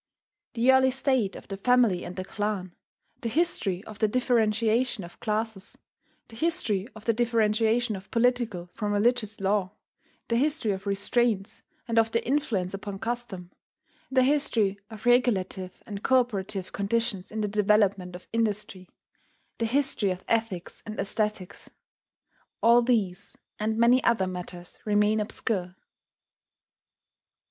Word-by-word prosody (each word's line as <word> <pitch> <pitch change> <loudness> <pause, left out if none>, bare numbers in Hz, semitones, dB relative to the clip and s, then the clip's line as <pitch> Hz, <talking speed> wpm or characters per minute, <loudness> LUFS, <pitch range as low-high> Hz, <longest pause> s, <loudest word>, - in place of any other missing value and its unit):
The 245 +3 +5
early 260 0 +5
state 260 -6 0
of - - -11
the 195 - -5
family 235 -4 +3
and 180 - -7
the 185 - -4
clan; 205 -3 -3 0.5
the 230 - -3
history 220 - 0
of 215 -2 -11
the 215 - +3
differentiation 230 -1 +1
of 170 - -12
classes; 215 -2 -3 0.5
the 225 - -14
history 230 - 0
of 220 0 -12
the 230 - +3
differentiation 225 0 +2
of 190 0 -10
political 230 -6 +1
from 210 -2 -2
religious 215 0 +1
law; 195 -1 0 0.5
the 230 - +1
history 285 -4 +1
of 195 +1 -5
restraints, 200 +1 0 0.3
and 230 -1 +3
of 225 0 +3
their 230 0 0
influence 235 -10 0
upon 200 0 -5
custom; 220 -5 -4 0.6
the 260 -1 +4
history 235 -8 +1
of 220 0 -11
regulative 200 -7 +1
and 205 -2 -6
cooperative 210 -7 0
conditions 205 -1 -1
in 220 0 -3
the 210 - 0
development 200 -3 +2
of 180 - -11
industry; 210 -4 -2 0.7
the 230 - +1
history 255 -5 +1
of 185 0 -4
ethics 225 -6 -2
and 215 0 -7
aesthetics, 210 -2 -3 0.9
all 235 +1 +7
these 215 -7 -1 0.2
and 220 +1 -1
many 240 +3 +5
other 230 -5 +3
matters 180 -1 -7
remain 210 +1 +2
obscure. 195 -3 -2
215 Hz, 135 wpm, -27 LUFS, 195-235 Hz, 0.9 s, all